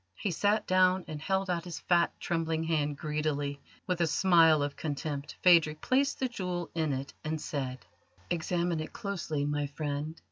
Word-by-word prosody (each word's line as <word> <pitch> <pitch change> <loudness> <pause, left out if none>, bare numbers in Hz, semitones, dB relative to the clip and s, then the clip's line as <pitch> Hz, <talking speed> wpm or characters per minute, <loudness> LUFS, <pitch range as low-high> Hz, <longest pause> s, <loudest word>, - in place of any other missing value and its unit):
He 195 - -2
sat 205 +5 +1
down, 185 0 +3
and 150 -1 -6
held 190 +3 0
out 175 -2 -1
his 170 -5 -6
fat, 170 -1 +3
trembling 165 -1 -1
hand 150 -3 0
greedily. 145 -2 -2 0.2
With 180 -2 -1
a 170 - +3
smile 165 -3 +5
of 145 0 -3
contempt 145 -1 -4
Phadrig 165 -4 +5
placed 275 - +1
the 260 - +1
jewel 180 -7 -4
in 160 -3 0
it, 135 +1 -4
and 155 0 -2
said: 130 -7 -4 0.5
"Examine 170 0 0
it 155 - -6
closely, 170 -7 -3
my 145 0 -1
friend. 145 +2 -4
160 Hz, 170 wpm, -30 LUFS, 145-180 Hz, 0.5 s, smile